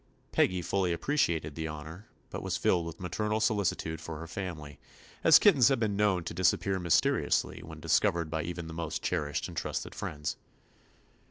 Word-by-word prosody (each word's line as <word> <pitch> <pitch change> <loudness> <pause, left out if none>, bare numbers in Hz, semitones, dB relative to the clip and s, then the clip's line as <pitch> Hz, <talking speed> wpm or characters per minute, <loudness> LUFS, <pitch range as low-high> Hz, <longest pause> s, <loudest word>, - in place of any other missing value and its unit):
Peggy 90 -1 +2
fully 90 -1 0
appre 145 - -3
ciated 80 - +1
the 80 +1 -4
honor, 80 +6 -8 0.2
but - - -5
was - - -2
filled 85 -2 +1
with 85 0 -8
maternal 105 +4 -1
solicitude 100 -7 0
for 80 -1 -6
her 80 - -7
family, 80 -5 -6 0.4
as - - +9
kittens 125 -4 +6
have 135 -3 +2
been 105 -3 0
known 100 -4 +2
to 80 - -5
disap 90 +1 +2
pear 95 -1 -1
mysteriously 85 -3 +1
when - - -10
discovered 85 -2 +1
by 80 -1 -1
even 85 0 -5
the 80 - -8
most 80 -1 -4
cherished 75 -4 -1
and 90 - -10
trusted 80 - -3
friends. 75 -1 -4
85 Hz, 180 wpm, -30 LUFS, 80-95 Hz, 0.4 s, as